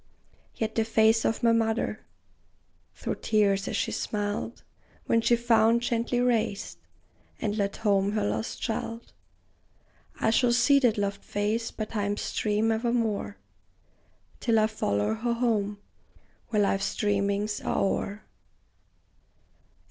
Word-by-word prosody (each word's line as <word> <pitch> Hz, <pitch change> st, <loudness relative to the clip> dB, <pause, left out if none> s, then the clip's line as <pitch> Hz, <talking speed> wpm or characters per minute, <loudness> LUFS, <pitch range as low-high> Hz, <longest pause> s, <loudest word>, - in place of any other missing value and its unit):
Yet 220 Hz, -1 st, -2 dB
the 225 Hz, -, +1 dB
face 220 Hz, 0 st, +3 dB
of 225 Hz, +2 st, 0 dB
my 230 Hz, -, +5 dB
mother, 225 Hz, 0 st, 0 dB, 0.9 s
through -, -, -4 dB
tears 200 Hz, -2 st, +1 dB
as -, -, -2 dB
she -, -, -1 dB
smiled, 205 Hz, +2 st, -3 dB, 0.4 s
When 230 Hz, -, +2 dB
she 235 Hz, -, +4 dB
found, 235 Hz, 0 st, +3 dB
gently 240 Hz, +1 st, 0 dB
raised, 220 Hz, -, 0 dB, 0.6 s
and 205 Hz, -, -1 dB
led 200 Hz, -2 st, -1 dB
home 200 Hz, -2 st, +1 dB
her 210 Hz, -1 st, 0 dB
lost 220 Hz, -, -3 dB
child 230 Hz, 0 st, -4 dB, 1.1 s
I 220 Hz, -, +2 dB
shall 240 Hz, +1 st, +3 dB
see 275 Hz, +4 st, +5 dB
that 245 Hz, -5 st, +2 dB
loved 200 Hz, 0 st, -2 dB
face 215 Hz, +3 st, -1 dB
by 215 Hz, -, -4 dB
time's 205 Hz, -1 st, -2 dB
stream 215 Hz, +1 st, 0 dB
evermore, 225 Hz, -, -1 dB, 1.0 s
Till 230 Hz, -2 st, +2 dB
I 215 Hz, -, +4 dB
follow 105 Hz, -, 0 dB
her 235 Hz, +2 st, -1 dB
home, 215 Hz, -4 st, 0 dB, 0.7 s
where 210 Hz, -2 st, +2 dB
life's 195 Hz, 0 st, 0 dB
dreamings 205 Hz, 0 st, 0 dB
are -, -, -1 dB
o'er. 200 Hz, +1 st, -1 dB
220 Hz, 125 wpm, -27 LUFS, 205-230 Hz, 1.1 s, my